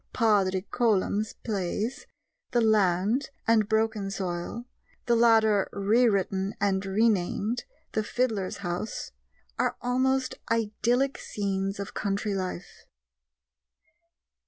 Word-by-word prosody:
Padraic 200 -4 +2
Colum's 215 -2 +1
plays 215 +5 -2 0.5
The 240 - +4
Land 215 +3 +2 0.2
and 220 -2 +3
Broken 220 -2 +1
Soil 190 +4 -4 0.4
(the 235 - +3
latter 220 -3 +4
rewritten 200 -2 +1
and 195 -2 +1
renamed 210 - +1 0.3
The 215 - 0
Fiddler's 215 -5 -1
House) 175 +5 -4 0.5
are - - +1
almost 260 +1 +1 0.2
idyllic 230 +4 +1
scenes 195 -1 -2
of 200 - -5
country 200 +1 -1
life. 185 -1 -5
210 Hz, 95 wpm, -27 LUFS, 195-230 Hz, 0.5 s, The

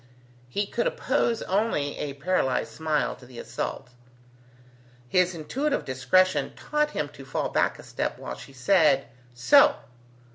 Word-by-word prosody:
He 205 +10 -1
could 235 +4 -1
oppose 235 -4 0
only 190 -8 0
a 145 -2 -3
paralyzed 140 -3 0
smile 155 -2 -1
to 125 - -15
the 125 -1 -13
assault. 125 - -5 1.2
His 180 +5 +2
intuitive 260 - -2
discretion 135 +9 +2
taught 300 0 0
him 150 - -2
to 145 -2 -12
fall 135 - -2
back - - +1
a - - -12
step - - -3
while - - -6
she - - -12
said, 140 0 +3 0.3
"So!" 285 - +6
160 Hz, 140 wpm, -26 LUFS, 135-205 Hz, 1.2 s, So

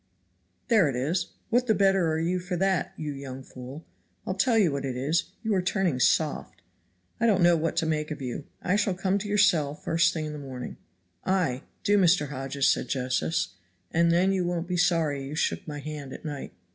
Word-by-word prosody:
"There 210 -10 +4
it 135 - -3
is 165 +8 0 0.2
what 245 +2 +3
the 220 - +4
better 195 -4 +3
are 155 - 0
you 175 +3 0
for 180 0 -4
that, 190 +1 +1
you 150 -2 -4
young 135 -1 -7
fool? 130 +5 -10 0.4
I'll - - -1
tell 225 +4 +2
you 190 -8 +4
what 140 0 -3
it 130 -2 -3
is, 150 +6 +1 0.2
you 220 -1 0
are 190 - +2
turning 180 -7 0
soft. 150 +3 +1 0.6
I 235 - +3
don't 195 -5 +3
know 175 0 +6
what 165 0 -1
to - - +2
make 155 -1 -1
of 150 - -5
you. 130 +2 -5 0.2
I 185 +3 +2
shall 200 -3 +1
come 190 +2 0
to 205 - -5
your 205 - +1
cell 160 -8 +3
the - - -23
first 165 +2 +3
thing 160 -3 -3
in 150 - -5
the 150 - -6
morning." 130 -3 -7 0.5
"Ay, 170 -9 +1 0.2
do, 205 0 +4
Mr. 170 -5 +3
Hodges," 135 0 -1
said - - +2
Josephs, 130 - 0 0.4
"and 170 0 +3
then 180 +3 +3
you 190 -2 +1
won't 175 -1 -2
be 180 - -1
sorry 165 -5 +2
you 140 +2 -6
shook - - -1
hands 145 -2 -6
at - - -10
night." 145 -3 -5
165 Hz, 215 wpm, -27 LUFS, 140-185 Hz, 0.6 s, know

